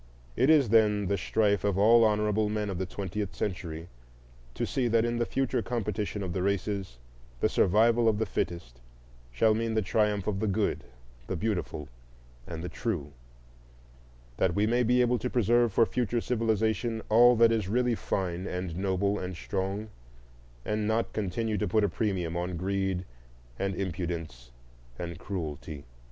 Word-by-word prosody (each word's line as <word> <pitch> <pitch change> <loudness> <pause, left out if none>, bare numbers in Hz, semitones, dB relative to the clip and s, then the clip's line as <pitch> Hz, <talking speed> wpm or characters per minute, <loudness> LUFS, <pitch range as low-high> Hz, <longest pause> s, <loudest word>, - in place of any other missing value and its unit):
It 130 +4 +3
is, 145 -7 +5
then, 105 -2 +4
the 100 +2 +1
strife 100 +2 +1
of 100 -2 +1
all 115 +3 +6
honorable 105 0 +2
men 105 -1 -2
of 90 - -4
the 95 - -2
twentieth 100 +1 -4
century 85 -4 -4 0.7
to - - -1
see 130 -3 0
that 115 0 +3
in 120 0 -1
the 120 - 0
future 135 -2 0
competition 105 -3 -3
of 90 -2 -4
races 95 - -1 0.4
the - - +3
survival 115 +4 +3
of 105 - +1
the 110 - 0
fittest 85 - -4 0.5
shall 110 - +3
mean 115 0 -1
the 110 - +3
triumph 105 -1 +1
of 100 -2 -1
the 110 - 0
good, 100 -7 0 0.4
the - - -2
beautiful, 90 -6 -2 0.6
and 85 -1 -6
the - - -3
true; 85 -5 -3 1.3
that 85 -3 +1
we 105 - +3
may 120 +3 +2
be 125 +1 +3
able 125 0 +2
to 125 - -2
preserve 120 0 +3
for 115 - +4
future 120 0 -1
civilization 110 -1 0
all 120 +3 +6
that 115 0 +5
is 110 -4 0
really 125 +2 +2
fine 95 -4 -2
and 90 -2 -4
noble 100 +2 0
and 90 0 -5
strong, 95 +4 -3 0.8
and 105 0 -1
not 110 +1 0
continue 105 +1 -1
to - - 0
put 110 +4 +2
a - - +4
premium 90 -4 -2
on 90 0 -2
greed 95 0 -1 0.5
and 95 -1 -1
impudence 85 -9 -4 0.5
and 85 -1 -6
cruelty. 75 -6 -5
105 Hz, 165 wpm, -29 LUFS, 90-115 Hz, 1.3 s, all